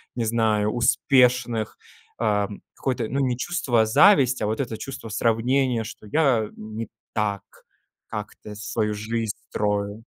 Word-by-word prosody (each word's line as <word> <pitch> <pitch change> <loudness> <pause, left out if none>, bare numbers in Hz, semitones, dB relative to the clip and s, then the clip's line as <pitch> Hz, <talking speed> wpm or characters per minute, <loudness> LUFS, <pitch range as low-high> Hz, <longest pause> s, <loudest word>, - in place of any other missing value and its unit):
не 120 -2 -1
знаю, 110 -2 +1
успешных, 120 -1 +2 0.4
э, 105 -3 +1 0.3
какой-то, 130 -4 -2
ну, 135 - -2
не 130 -3 +1
чувство 125 -7 +1
зависти, 130 - +5
а 105 - +1
вот 110 +1 -2
это 120 -5 -2
чувство 135 -3 -7
сравнения, 115 +3 +1
что 110 -1 -10
я 125 -5 +2
не 110 +1 -6 0.3
так 105 -2 -1 0.7
как-то 105 0 -7
свою 105 +1 -2
жизнь 110 +1 -2 0.2
строю? 105 +1 -1
115 Hz, 130 wpm, -24 LUFS, 105-125 Hz, 0.7 s, зависти